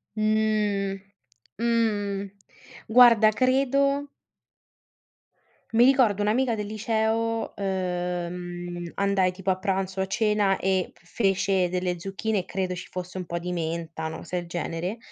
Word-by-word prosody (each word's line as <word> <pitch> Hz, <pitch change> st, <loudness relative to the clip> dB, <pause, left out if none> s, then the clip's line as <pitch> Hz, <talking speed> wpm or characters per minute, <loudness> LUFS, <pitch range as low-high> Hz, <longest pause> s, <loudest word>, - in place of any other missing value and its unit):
Mh, 215 Hz, -2 st, +1 dB, 0.6 s
mh, 205 Hz, -4 st, 0 dB, 0.6 s
guarda, 230 Hz, -2 st, +7 dB
credo 275 Hz, +3 st, +2 dB, 1.6 s
Mi 230 Hz, +1 st, +6 dB
ricordo 245 Hz, -6 st, +4 dB
un'amica 230 Hz, +3 st, +1 dB
del 210 Hz, -1 st, -4 dB
liceo, 220 Hz, +1 st, -1 dB
ehm, 175 Hz, -2 st, -3 dB
andai 200 Hz, -2 st, +2 dB
tipo 190 Hz, +1 st, -4 dB
a 185 Hz, -, +2 dB
pranzo 190 Hz, -1 st, -2 dB
o -, -, +2 dB
a -, -, -2 dB
cena, 205 Hz, -1 st, +2 dB
e 190 Hz, -1 st, 0 dB
fece 195 Hz, 0 st, 0 dB
delle 180 Hz, 0 st, -2 dB
zucchine 200 Hz, +4 st, -2 dB
e 180 Hz, -, -5 dB
credo 185 Hz, -1 st, -2 dB
ci 180 Hz, +1 st, -7 dB
fosse 180 Hz, 0 st, -6 dB
un 185 Hz, -, -4 dB
po' 170 Hz, 0 st, -4 dB
di 175 Hz, +1 st, -4 dB
menta, 165 Hz, -1 st, -3 dB
una 160 Hz, 0 st, -4 dB
cosa 180 Hz, -, -5 dB
del 175 Hz, -1 st, -4 dB
genere, 175 Hz, +4 st, -3 dB
195 Hz, 130 wpm, -26 LUFS, 180-220 Hz, 1.6 s, guarda